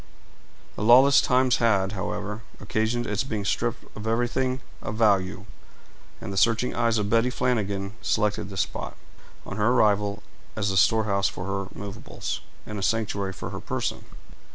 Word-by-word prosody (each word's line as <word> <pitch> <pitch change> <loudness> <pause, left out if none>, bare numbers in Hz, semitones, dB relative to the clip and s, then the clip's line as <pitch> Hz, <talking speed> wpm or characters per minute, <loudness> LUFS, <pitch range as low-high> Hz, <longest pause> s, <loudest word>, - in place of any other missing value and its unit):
The - - -6
lawless 130 +5 +7
times 125 0 +3
had, 100 -5 +2
however, 105 +2 -4 0.2
occasioned 110 +2 -1
its 105 +3 -1
being 110 -6 -3
stripped - - -1
of 110 +1 -6
everything 125 +3 0 0.2
of - - -4
value; 100 -4 +2 0.7
and 100 - -6
the - - -5
searching 115 +4 +3
eyes 115 -1 +1
of 105 -1 0
Betty 115 +3 +3
Flanagan 100 -6 -1
selected 105 -2 0
this 95 -2 -1
spot, - - -5 0.5
on 100 - -6
her 105 0 +2
arrival, 105 -3 +2 0.3
as 100 -2 0
the 95 - 0
storehouse 100 -1 +3
for 90 - -7
her 100 -1 -3
movables 100 -1 -5 0.2
and 105 -1 -5
a - - -4
sanctuary 100 -1 0
for - - -6
her - - -5
person. - - -3
105 Hz, 155 wpm, -26 LUFS, 100-115 Hz, 0.7 s, lawless